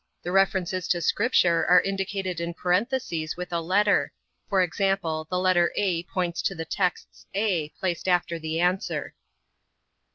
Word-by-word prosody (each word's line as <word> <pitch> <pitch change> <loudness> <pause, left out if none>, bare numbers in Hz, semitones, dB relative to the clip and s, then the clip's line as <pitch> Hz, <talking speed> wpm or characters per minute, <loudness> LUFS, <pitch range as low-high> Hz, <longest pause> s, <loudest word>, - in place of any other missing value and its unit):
The 175 - -3
references 185 -1 +1
to 175 - +1
Scripture 175 -2 +2
are 180 0 +7
indicated 195 -2 -3
in 170 0 -4
parentheses 180 -4 -1
with 180 0 -6
a 170 - 0
letter. 200 +5 +2 0.4
For 195 -3 +3
example, 175 -4 -1
the 180 - -1
letter 180 -2 +3
(a) 185 -5 +1
points 175 -1 -2
to 195 - -1
the 165 0 -5
texts 180 -1 -3
(a) 190 -7 0
placed 180 -1 -2
after 175 -2 +1
the 160 +1 -3
answer. 180 +3 -1
180 Hz, 150 wpm, -26 LUFS, 170-195 Hz, 0.4 s, are